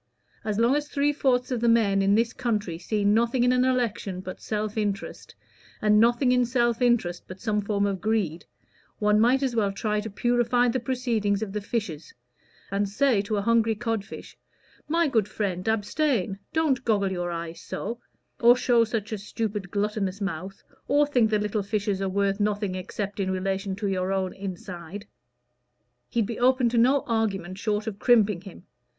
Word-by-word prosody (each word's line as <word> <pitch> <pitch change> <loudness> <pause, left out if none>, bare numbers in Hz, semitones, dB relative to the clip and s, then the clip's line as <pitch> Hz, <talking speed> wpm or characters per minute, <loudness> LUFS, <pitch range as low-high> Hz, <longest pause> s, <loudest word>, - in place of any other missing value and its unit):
As 210 -2 -2
long 235 +4 +3
as 295 0 -1
three 290 +1 +1
fourths 255 -3 +1
of 245 -2 -1
the 235 - +3
men 205 -4 +3
in 195 +1 +3
this 230 +1 +1
country 210 -9 -2
see 205 +3 -1
nothing 235 +4 +3
in 250 - +4
an 250 0 +3
election 235 -7 -1
but 185 0 -8
self 215 -1 -3
interest, 205 -2 -4 0.4
and 210 0 +4
nothing 240 +3 +4
in 250 0 +4
self 240 -1 +1
interest 235 -8 +1
but 185 +1 -9
some 215 -3 0
form 200 0 0
of 195 -3 -2
greed, 200 -7 -1 0.5
one 210 -1 +3
might 250 +5 +3
as 255 -3 -1
well 205 -3 +1
try 210 +1 -1
to 215 +1 -5
purify 240 +3 +2
the 245 +2 0
proceedings 230 -5 -1
of 195 -3 -6
the 210 - -2
fishes, 195 -8 -4 0.6
and 200 0 0
say 230 0 +2
to 210 +1 -2
a 200 - -1
hungry 225 -1 +3
cod 225 -1 -2
fish - - -11 0.5
'My 335 +1 +2
good 225 -7 +1
friend, 195 -3 -3
abstain; 220 - 0
don't 315 -5 +1
goggle 200 -4 +1
your 175 -1 -2
eyes 170 -1 -5
so, 230 +3 -5 0.4
or 240 +1 +7
show 245 -2 +3
such 220 -1 -3
a 215 - -3
stupid 210 -1 -4
gluttonous 200 -1 -2
mouth, 195 0 -5 0.2
or 290 +1 +4
think 245 -6 +2
the 215 - +2
little 210 0 -1
fishes 200 -1 -2
are 195 - 0
worth 200 +1 0
nothing 205 -2 0
except 200 +2 -5
in 190 -1 0
relation 190 +1 -2
to 205 +2 -5
your 190 -1 -1
own 190 -1 -1
inside.' 185 0 -7 1.0
He'd 230 -3 +1
be 230 +2 -5
open 255 0 +3
to 235 0 +1
no 260 +4 +4
argument 200 -5 -1
short 210 -1 -1
of 210 -3 -5
crimping 215 -7 +3
him. 195 -2 -12
210 Hz, 185 wpm, -26 LUFS, 195-240 Hz, 1.0 s, or